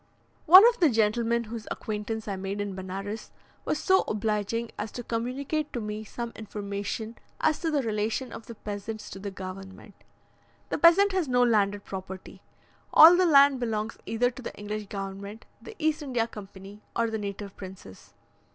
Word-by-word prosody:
One 375 Hz, +7 st, +11 dB
of 485 Hz, 0 st, +1 dB
the 330 Hz, -, +5 dB
gentlemen 230 Hz, +1 st, +1 dB
whose 225 Hz, 0 st, -8 dB
acquaintance 215 Hz, +1 st, -4 dB
I 200 Hz, -, -2 dB
made 195 Hz, +1 st, -4 dB
in 205 Hz, -1 st, -3 dB
Benares, 195 Hz, +3 st, -6 dB, 0.4 s
was -, -, 0 dB
so 380 Hz, 0 st, +3 dB
obliging 215 Hz, +2 st, -1 dB
as 210 Hz, 0 st, -5 dB
to 245 Hz, -, -6 dB
communicate 265 Hz, +7 st, -2 dB
to 245 Hz, -, -2 dB
me 210 Hz, 0 st, -5 dB
some 235 Hz, +2 st, -6 dB
information 210 Hz, +1 st, -5 dB, 0.2 s
as 310 Hz, -1 st, +2 dB
to 330 Hz, -, -1 dB
the 295 Hz, -3 st, +1 dB
relation 220 Hz, +3 st, -2 dB
of 225 Hz, -, -9 dB
the 235 Hz, -, -8 dB
peasants 210 Hz, +1 st, -6 dB
to 195 Hz, -, -8 dB
the 200 Hz, +1 st, -5 dB
government. 190 Hz, +1 st, -9 dB, 0.8 s
The -, -, -2 dB
peasant 390 Hz, +4 st, +6 dB
has 375 Hz, -5 st, 0 dB
no 245 Hz, -1 st, +3 dB
landed 205 Hz, -4 st, +2 dB
property. 190 Hz, -1 st, -8 dB, 0.5 s
All 330 Hz, +3 st, +10 dB
the 365 Hz, 0 st, +4 dB
land 280 Hz, -3 st, +6 dB
belongs 225 Hz, -2 st, -3 dB
either 245 Hz, +2 st, +1 dB
to 255 Hz, -, -11 dB
the -, -, -7 dB
English 210 Hz, 0 st, -5 dB
government, 200 Hz, +2 st, -7 dB, 0.2 s
the 445 Hz, -, -11 dB
East 315 Hz, -1 st, 0 dB
India 250 Hz, -6 st, 0 dB
Company, 200 Hz, -2 st, -11 dB
or 230 Hz, -1 st, +1 dB
the 220 Hz, -, -2 dB
native 200 Hz, -1 st, -6 dB
princes. 185 Hz, -, -12 dB
220 Hz, 170 wpm, -27 LUFS, 205-245 Hz, 0.8 s, One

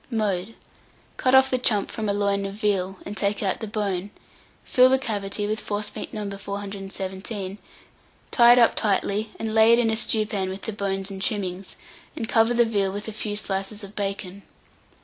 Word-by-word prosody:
Mode. 215 Hz, -3 st, -1 dB, 0.6 s
Cut 255 Hz, 0 st, +3 dB
off 265 Hz, 0 st, +6 dB
the 255 Hz, -, +2 dB
chump 210 Hz, -5 st, +2 dB
from 215 Hz, -2 st, -3 dB
a -, -, +2 dB
loin 200 Hz, -1 st, +1 dB
of 195 Hz, -, -7 dB
veal, 195 Hz, -3 st, 0 dB
and 205 Hz, -, -6 dB
take 205 Hz, 0 st, 0 dB
out 190 Hz, -, 0 dB
the 220 Hz, -, -5 dB
bone; 200 Hz, -3 st, -2 dB, 0.5 s
fill 255 Hz, -1 st, +5 dB
the 265 Hz, -, +4 dB
cavity 205 Hz, -5 st, -3 dB
with 215 Hz, +1 st, -1 dB
forcemeat 205 Hz, 0 st, -3 dB
No. 210 Hz, -3 st, -4 dB
417, 195 Hz, 0 st, -5 dB, 0.7 s
tie 240 Hz, -1 st, +7 dB
it -, -, +3 dB
up 235 Hz, -2 st, +6 dB
tightly, 210 Hz, +1 st, 0 dB
and 220 Hz, -1 st, -3 dB
lay 220 Hz, +1 st, +6 dB
it -, -, +6 dB
in 230 Hz, -2 st, +2 dB
a -, -, +1 dB
stewpan 215 Hz, -4 st, 0 dB
with 190 Hz, +1 st, -7 dB
the 220 Hz, -, -3 dB
bones 195 Hz, -1 st, -3 dB
and 190 Hz, -1 st, -7 dB
trimmings, 190 Hz, -2 st, -3 dB, 0.4 s
and 235 Hz, -8 st, -3 dB
cover 225 Hz, +1 st, +3 dB
the 240 Hz, 0 st, +5 dB
veal 200 Hz, -4 st, 0 dB
with 205 Hz, +2 st, -6 dB
a -, -, -3 dB
few 210 Hz, -1 st, -3 dB
slices 205 Hz, +1 st, -2 dB
of 200 Hz, +1 st, -10 dB
bacon. 195 Hz, -1 st, -4 dB
205 Hz, 190 wpm, -24 LUFS, 195-220 Hz, 0.7 s, tie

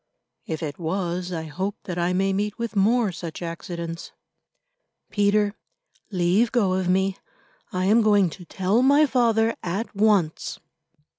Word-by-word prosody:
"If 160 Hz, 0 st, -4 dB
it 150 Hz, +1 st, -5 dB
was, 175 Hz, +1 st, -2 dB
I 165 Hz, -2 st, -3 dB
hope 185 Hz, +6 st, -3 dB
that 175 Hz, -2 st, -4 dB
I 175 Hz, +1 st, +1 dB
may 195 Hz, +1 st, +1 dB
meet 205 Hz, +1 st, -2 dB
with 230 Hz, -2 st, -4 dB
more 215 Hz, +2 st, +3 dB
such 170 Hz, 0 st, -7 dB
accidents." 170 Hz, 0 st, -6 dB, 1.0 s
"Peter, 205 Hz, 0 st, +2 dB, 0.6 s
leave 190 Hz, +4 st, +2 dB
go 205 Hz, -7 st, +2 dB
of 185 Hz, -1 st, 0 dB
me. 190 Hz, +1 st, +1 dB, 0.5 s
I 185 Hz, -2 st, -1 dB
am 215 Hz, +4 st, +5 dB
going 205 Hz, -5 st, +4 dB
to 180 Hz, -, -11 dB
tell 195 Hz, +6 st, +1 dB
my 285 Hz, +3 st, +5 dB
father, 230 Hz, -4 st, +2 dB
at 195 Hz, +6 st, -4 dB
once." 200 Hz, -6 st, +1 dB
190 Hz, 145 wpm, -24 LUFS, 175-215 Hz, 1.0 s, am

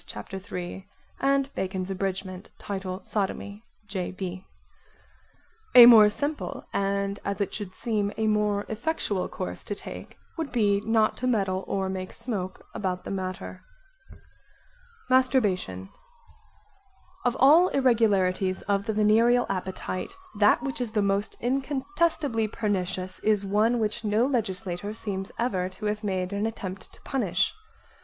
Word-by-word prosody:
Bacon's 195 Hz, +2 st, -3 dB
Abridg. 190 Hz, 0 st, -4 dB
Title 190 Hz, -2 st, -4 dB
Sodomy. 205 Hz, +1 st, -3 dB, 0.2 s
J.B.) 185 Hz, -1 st, -5 dB, 1.3 s
A 245 Hz, -1 st, +13 dB
more 220 Hz, -3 st, +9 dB
simple 290 Hz, +8 st, -4 dB
and 200 Hz, 0 st, 0 dB
as 200 Hz, 0 st, -3 dB
it 200 Hz, -, -1 dB
should 200 Hz, -3 st, -5 dB
seem 210 Hz, -4 st, -1 dB
a 220 Hz, -, 0 dB
more 210 Hz, -1 st, +1 dB
effectual 220 Hz, -, -1 dB
course 185 Hz, -, -5 dB
to 205 Hz, -, -4 dB
take -, -, -9 dB, 0.2 s
would 320 Hz, -3 st, -3 dB
be 205 Hz, -4 st, +2 dB
not 220 Hz, 0 st, +2 dB
to 255 Hz, -, -2 dB
meddle 195 Hz, -5 st, +1 dB
or 195 Hz, -1 st, -1 dB
make 185 Hz, -1 st, -4 dB
smoke 205 Hz, -6 st, -5 dB
[?] -, -, -31 dB
about 185 Hz, -2 st, -2 dB
the -, -, -6 dB
matter. 185 Hz, -1 st, -5 dB, 1.5 s
Masturbation 205 Hz, -, +1 dB, 1.3 s
Of 245 Hz, -1 st, +1 dB
all 310 Hz, +7 st, +7 dB
irregularities 200 Hz, -, +2 dB
of 200 Hz, -1 st, 0 dB
the 220 Hz, -, 0 dB
venereal 225 Hz, +4 st, +4 dB
appetite, 190 Hz, -, -4 dB, 0.2 s
that 205 Hz, 0 st, +5 dB
which 270 Hz, -2 st, -3 dB
is 230 Hz, -3 st, -3 dB
the 210 Hz, -2 st, +2 dB
most 200 Hz, +1 st, 0 dB
incontestably 275 Hz, -, 0 dB
pernicious 190 Hz, -4 st, -2 dB
is 210 Hz, -2 st, +2 dB
one 215 Hz, +5 st, +2 dB
which 220 Hz, +1 st, -1 dB
no 215 Hz, +3 st, +2 dB
legislator 205 Hz, -5 st, -2 dB
seems 195 Hz, -3 st, -4 dB
ever 190 Hz, -7 st, 0 dB
to 190 Hz, +3 st, -8 dB
have 210 Hz, +1 st, -1 dB
made 190 Hz, -1 st, -2 dB
an 205 Hz, +2 st, 0 dB
attempt 195 Hz, -4 st, -6 dB
to -, -, -17 dB
punish. 200 Hz, -10 st, 0 dB
205 Hz, 130 wpm, -27 LUFS, 190-230 Hz, 1.5 s, A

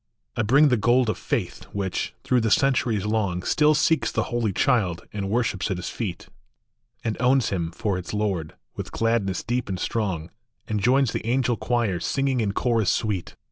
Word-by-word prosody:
[ 60 Hz, -, -2 dB
bring 145 Hz, +5 st, +6 dB
the 125 Hz, -, +3 dB
gold 120 Hz, +1 st, +3 dB
of -, -, -6 dB
faith, -, -, -3 dB
which, 95 Hz, -2 st, -3 dB
through 125 Hz, -1 st, +2 dB
the 110 Hz, -, +1 dB
centuries 120 Hz, -5 st, +2 dB
long, 100 Hz, -5 st, 0 dB
Still 150 Hz, +7 st, +3 dB
seeks 145 Hz, -5 st, +2 dB
the -, -, 0 dB
Holy 115 Hz, -3 st, +1 dB
Child, 95 Hz, -6 st, +1 dB
and 100 Hz, -2 st, -3 dB
worships 110 Hz, -3 st, 0 dB
at 95 Hz, -, -1 dB
his 90 Hz, -, -4 dB
feet, 100 Hz, -7 st, -5 dB, 0.8 s
\nd 110 Hz, -, -1 dB
owns 125 Hz, +1 st, +3 dB
him 85 Hz, -4 st, -2 dB
for 100 Hz, 0 st, -2 dB
its 90 Hz, -, -7 dB
Lord, 100 Hz, -7 st, -2 dB, 0.2 s
with -, -, -6 dB
gladness 115 Hz, -5 st, 0 dB
deep 120 Hz, -2 st, -2 dB
and 95 Hz, -1 st, -3 dB
strong, 95 Hz, -7 st, -2 dB, 0.4 s
And 105 Hz, -1 st, -1 dB
joins 130 Hz, +2 st, +3 dB
the -, -, -3 dB
angel 125 Hz, 0 st, +2 dB
choir, 115 Hz, -7 st, 0 dB
singing 135 Hz, +4 st, 0 dB
in 105 Hz, -2 st, 0 dB
chorus 115 Hz, -3 st, +1 dB
sweet. 105 Hz, -6 st, -1 dB
110 Hz, 180 wpm, -24 LUFS, 95-125 Hz, 0.8 s, bring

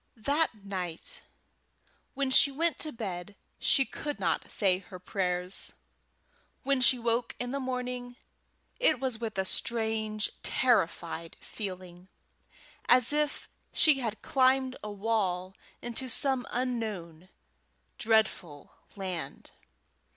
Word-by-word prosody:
That 260 Hz, -3 st, 0 dB
night 185 Hz, -, -3 dB, 0.9 s
when 275 Hz, -1 st, 0 dB
she 280 Hz, -, +8 dB
went 325 Hz, +4 st, 0 dB
to 310 Hz, -, -2 dB
bed 200 Hz, -5 st, -6 dB, 0.2 s
she 270 Hz, -1 st, +4 dB
could 295 Hz, +2 st, -5 dB
not -, -, 0 dB
say 185 Hz, -3 st, +3 dB
her 185 Hz, -1 st, -11 dB
prayers. 180 Hz, 0 st, -2 dB, 0.9 s
When 275 Hz, -1 st, +2 dB
she 250 Hz, +1 st, +6 dB
woke 235 Hz, 0 st, 0 dB
in 245 Hz, 0 st, -3 dB
the 275 Hz, -, -2 dB
morning 250 Hz, -1 st, -4 dB, 0.6 s
it -, -, +4 dB
was 255 Hz, -4 st, -1 dB
with 225 Hz, -3 st, -4 dB
a 190 Hz, -, +1 dB
strange, 220 Hz, 0 st, 0 dB
terrified 170 Hz, -8 st, +1 dB
feeling, 185 Hz, -3 st, -7 dB, 0.8 s
as 250 Hz, +2 st, +6 dB
if 300 Hz, -1 st, 0 dB, 0.3 s
she 300 Hz, -4 st, +5 dB
had 225 Hz, -4 st, -4 dB
climbed 260 Hz, 0 st, +3 dB
a 210 Hz, -, -4 dB
wall 195 Hz, -3 st, -1 dB, 0.3 s
into 240 Hz, +2 st, -1 dB
some 265 Hz, +1 st, +3 dB
unknown 210 Hz, -9 st, -3 dB, 0.7 s
dreadful 215 Hz, -9 st, +1 dB, 0.2 s
land. 185 Hz, -4 st, -5 dB
225 Hz, 115 wpm, -30 LUFS, 185-260 Hz, 0.9 s, she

